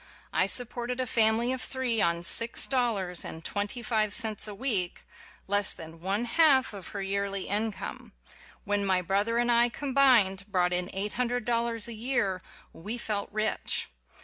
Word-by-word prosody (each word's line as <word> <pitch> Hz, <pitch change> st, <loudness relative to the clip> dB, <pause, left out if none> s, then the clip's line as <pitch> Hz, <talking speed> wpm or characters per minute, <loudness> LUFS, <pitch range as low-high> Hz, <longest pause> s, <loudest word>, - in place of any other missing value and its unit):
I -, -, +2 dB
supported 245 Hz, 0 st, +1 dB
a 255 Hz, -, 0 dB
family 230 Hz, +1 st, +3 dB
of 260 Hz, -, -4 dB
three 250 Hz, -4 st, -1 dB
on 170 Hz, 0 st, +1 dB
six 230 Hz, +7 st, +3 dB
dollars 215 Hz, -9 st, -1 dB
and 160 Hz, 0 st, -9 dB
twenty 205 Hz, +4 st, -3 dB
five 215 Hz, -2 st, +1 dB
cents 220 Hz, -3 st, +1 dB
a 210 Hz, -, -7 dB
week 200 Hz, -7 st, -1 dB
ŌĆö -, -, -19 dB
less 205 Hz, 0 st, +2 dB
than 165 Hz, 0 st, -11 dB
one 200 Hz, +6 st, -1 dB
half 265 Hz, -1 st, +4 dB
of 195 Hz, -3 st, -8 dB
her 200 Hz, -1 st, -5 dB
yearly 200 Hz, 0 st, -2 dB
income. 210 Hz, +1 st, -3 dB, 0.5 s
When 205 Hz, 0 st, 0 dB
my 190 Hz, -2 st, +1 dB
brother 205 Hz, +6 st, 0 dB
and 240 Hz, 0 st, +2 dB
I, 235 Hz, 0 st, +4 dB
combined, 250 Hz, -8 st, +3 dB
brought 180 Hz, -3 st, +1 dB
in 180 Hz, +1 st, -1 dB
eight 200 Hz, +2 st, -3 dB
hundred 245 Hz, -1 st, -1 dB
dollars 235 Hz, -2 st, 0 dB
a 235 Hz, -, -5 dB
year 215 Hz, -5 st, -1 dB, 0.3 s
we 210 Hz, +8 st, -6 dB
felt 210 Hz, -4 st, -3 dB
rich 215 Hz, +1 st, -2 dB
215 Hz, 170 wpm, -28 LUFS, 195-240 Hz, 0.5 s, half